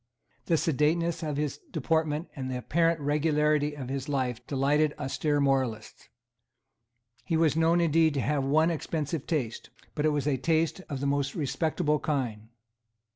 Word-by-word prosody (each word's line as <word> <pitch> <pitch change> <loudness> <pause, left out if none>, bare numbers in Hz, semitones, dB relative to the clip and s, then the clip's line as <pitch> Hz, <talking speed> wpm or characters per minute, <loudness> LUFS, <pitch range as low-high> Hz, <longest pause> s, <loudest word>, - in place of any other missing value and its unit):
The 165 - +3
sedateness 165 +2 +1
of 150 -3 -3
his 145 -1 -2
deportment 160 0 -1
and 130 -3 -4
the 130 - -2
apparent 165 +5 +1
regularity 150 0 +1
of 130 -3 -6
his 135 +1 -4
life 130 -4 -1
delighted 145 +2 +1
austere 145 +1 -1
moralists. 130 -6 -1 1.1
He 165 - 0
was 160 -2 +3
known 165 +2 +3
indeed 165 -2 +3
to 135 - +1
have 140 +4 0
one 155 +5 +3
expensive 155 -2 -3
taste; 130 -9 -2 0.2
but 150 - -2
it - - +4
was 145 -2 -1
a 145 -3 +1
taste 165 +5 0
of 140 -3 -4
the - - -1
most 140 -1 0
respectable 150 +1 0
kind. 120 -7 -2
150 Hz, 155 wpm, -28 LUFS, 135-160 Hz, 1.1 s, it